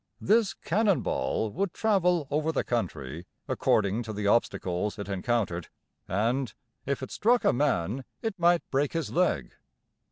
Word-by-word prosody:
This 215 0 +3
"cannon 200 +1 +1
ball" 110 - -1
would 190 - -2
travel 180 -8 +2
over 155 +2 +1
the 160 - 0
country 85 - -3 0.2
according 100 +2 +1
to 110 -2 -5
the 105 0 -3
obstacles 100 -2 +1
it 100 -2 -5
encountered 95 -3 -1 0.4
and, 115 +7 0 0.3
"if 140 -1 -1
it 130 - -6
struck 240 +3 +3
a - - +5
man, 125 - 0 0.2
it 220 -4 -3
might 175 0 +3
break 140 +1 +1
his 165 -1 -2
leg." 170 - +1
130 Hz, 150 wpm, -28 LUFS, -, 0.4 s, a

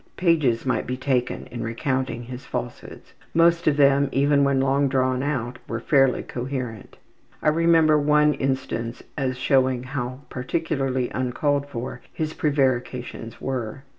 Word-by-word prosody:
Pages 155 -11 +2
might 130 - 0
be 125 +1 -2
taken 130 -2 -1
in 120 - -5
recounting 120 +1 -2
his 125 +2 -8
falsehoods. - - -7 0.2
Most 170 +1 +4
of 150 -2 +3
them, 140 0 +4
even 140 +1 +3
when 140 -1 +2
long 135 +1 +2
drawn 130 -1 +1
out, 125 -4 -2
were 115 - -3
fairly 135 +1 +3
coherent. 125 -4 -5 0.5
I - - +5
remember 160 -1 +4
one 150 +1 +4
instance 130 -4 -3
as 130 -3 -1
showing 130 -1 +2
how 130 0 -4
particularly 130 -2 -2
uncalled 140 +3 0
for 125 -1 -6
his 155 0 -3
prevarications 125 -5 -1
were. 130 -1 -4
135 Hz, 135 wpm, -24 LUFS, 125-145 Hz, 0.5 s, I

